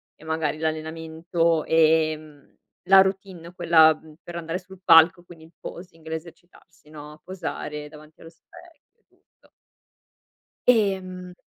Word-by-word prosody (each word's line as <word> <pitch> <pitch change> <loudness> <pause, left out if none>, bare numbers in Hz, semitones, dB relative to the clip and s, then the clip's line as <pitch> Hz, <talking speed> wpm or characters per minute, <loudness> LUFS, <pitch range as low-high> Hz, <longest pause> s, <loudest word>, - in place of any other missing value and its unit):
e - - -20
magari 160 -2 -2
l'allenamento 160 +1 -2
e, 160 -1 +3
ehm, 155 -2 -12 0.3
la 195 0 +8
routine 190 -3 -4
quella, 160 -2 +5
mhmm, 155 0 -17
per 175 - -10
andare 170 +1 -4
sul 190 0 -16
palco 165 +1 +6
quindi 165 -2 -15
il 165 - -21
posing, 165 -2 -11
l'esercitarsi, 165 0 -11
no, 150 0 -12
posare 150 -5 -6
davanti 155 +1 -16
allo 165 - -12
specchio, 330 - -20
tutto. - - -32 1.2
Ehm 185 -5 0
165 Hz, 125 wpm, -24 LUFS, 155-180 Hz, 1.2 s, la